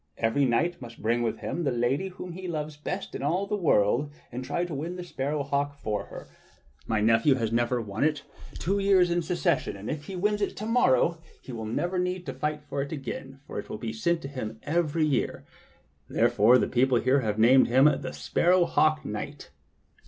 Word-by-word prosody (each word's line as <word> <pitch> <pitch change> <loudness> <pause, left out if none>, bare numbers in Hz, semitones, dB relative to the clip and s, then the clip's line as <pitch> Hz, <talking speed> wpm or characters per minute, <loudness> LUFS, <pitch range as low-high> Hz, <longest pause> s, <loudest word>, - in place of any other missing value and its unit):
Every 115 +5 +2
knight 145 +8 +1
must 115 -2 -10
bring 120 +2 +1
with 115 -1 -2
him 170 - -3
the 145 - +1
lady 125 +9 0
whom 180 -1 -8
he 185 +2 -7
loves 155 -3 -4
best 180 +6 -5
in - - -5
all 170 +8 0
the 205 - -2
world 145 - +2 0.2
and 125 +1 -5
try 145 +7 -1
to 175 - -6
win 160 +6 -4
the 180 - -6
sparrow 145 -3 -2
hawk 140 +1 -1
for 105 -6 -3
her. - - -10 0.6
My 110 -1 +1
nephew 115 +5 +4
has 115 -4 -1
now 120 +1 +2
won 105 +2 -3
it 150 -1 +1 0.3
two 195 +4 -1
years 190 -3 +4
in 175 0 +1
succession, 170 - 0
and 100 +2 -5
if 150 -1 -5
he 195 - -6
wins 210 +3 0
it 200 - 0
again - - -23
to 210 - -5
morrow 170 - +3 0.2
he - - -11
will 110 -2 -5
never 175 +11 -1
need 180 0 -2
to - - -4
fight 150 0 -3
for 140 -1 -3
it 140 - -5
again, 135 -2 -6
for - - -5
it - - -8
will - - -4
be 110 0 -5
sent 165 +9 0
to - - -4
him 115 -5 -6
every 160 0 +1
year. 140 -5 -1 0.6
Therefore 120 +1 +4
the - - +1
people 130 0 +3
about - - -1
here 130 +2 +4
have 105 -3 -1
named 125 +4 +6
him 130 +3 +5
the 150 - +2
Sparrow 180 0 +2
Hawk 155 -2 +2
knight." 135 +7 -6
145 Hz, 220 wpm, -27 LUFS, 120-170 Hz, 0.6 s, named